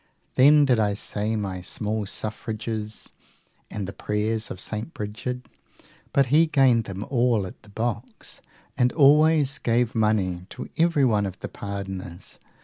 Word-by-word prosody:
Then 145 +3 +6
did 125 -4 +3
I 105 -2 +1
say 105 +2 -2
my 95 -4 -3
small 105 +2 -2
suffrages 110 0 -5 0.6
and 100 -3 -4
the 100 - -6
prayers 110 +2 -2
of 90 - -7
St. 110 - -5
Brigid; 110 +4 -5 0.6
but 140 - +4
he 165 +2 +6
gained 130 -7 +3
them 100 +1 -5
all 120 -5 +2
at 90 - -10
the 105 - -18
boxes, 115 +2 -5 0.3
and 125 0 +2
always 150 -1 +5
gave 120 0 +1
money 100 -5 0
to - - -7
everyone 135 -11 +3
of 95 +1 -8
the - - -5
pardoners. 95 -3 -7
110 Hz, 140 wpm, -25 LUFS, 105-125 Hz, 0.6 s, Then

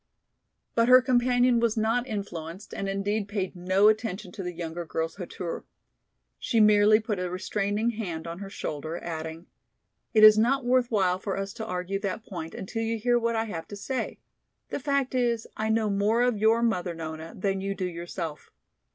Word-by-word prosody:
But 230 0 +3
her 255 0 +9
companion 245 -1 +3
was 230 -1 +1
not 230 +3 +1
influenced 190 -5 -6
and 195 - -3
indeed 200 +1 -1
paid 200 -2 -3
no 185 +3 +3
attention 215 -3 0
to 195 - -7
the 180 -1 -3
younger 170 0 -5
girl's 165 +1 -3
hauteur. 180 -2 -5 0.8
She 230 - +1
merely 210 0 +6
put 215 -3 -3
a 180 0 -2
restraining 205 +4 -1
hand 180 -8 -5
on 170 +1 -6
her 200 -1 -7
shoulder, 155 -2 -4
adding, 160 0 -6 0.7
"It 215 - +6
is 215 0 +10
not 255 +3 +2
worth 250 0 +3
while 185 -4 +2
for 195 0 -3
us 195 0 -4
to 220 - -6
argue 180 +1 -2
that 200 +2 -4
point 165 -4 -7
until 210 +4 -4
you 225 0 -1
hear 240 +2 +2
what 230 0 0
I 225 - +1
have 165 -7 -6
to 205 - -8
say. 255 +6 -3 0.5
The - - -3
fact 280 -1 0
is, 240 -3 +1
I 215 0 -1
know 220 0 +2
more 210 +4 +2
of 245 -2 +2
your 220 +3 +3
mother, 180 -7 0
Nona, 160 0 -7
than 195 0 -1
you 195 0 -2
do 185 - -2
yourself. 170 -2 -5
205 Hz, 185 wpm, -27 LUFS, 180-225 Hz, 0.8 s, is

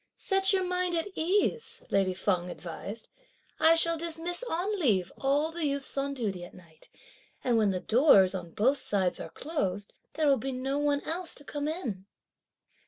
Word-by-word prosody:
"Set 385 0 +1
your 380 -1 +2
mind 360 -1 0
at 330 +4 -1
ease!" 400 +8 0
lady 190 -2 +2
Feng 180 -2 0
advised; 190 +5 -7 0.5
"I 325 +1 +6
shall 330 0 +2
dismiss 335 +2 0
on 405 -1 -2
leave 200 - +2
all 285 +4 +1
the 325 -2 -1
youths 280 -1 -3
on 280 0 -1
duty 200 -8 -3
at 175 - -11
night; 165 -3 -18 0.5
and 245 -2 +2
when 215 -2 +3
the 185 -2 -1
doors, 215 -7 +5
on 180 -3 -5
both 255 +11 +2
sides, 190 -7 0
are - - -6
closed, 205 - -3 0.2
there 310 0 0
will 275 -1 +5
be 270 +1 -3
no 270 +3 -2
one 290 -1 +1
else 335 +1 -2
to 290 - -8
come 290 +1 -4
in!" 235 - -4
280 Hz, 175 wpm, -29 LUFS, 200-330 Hz, 0.5 s, I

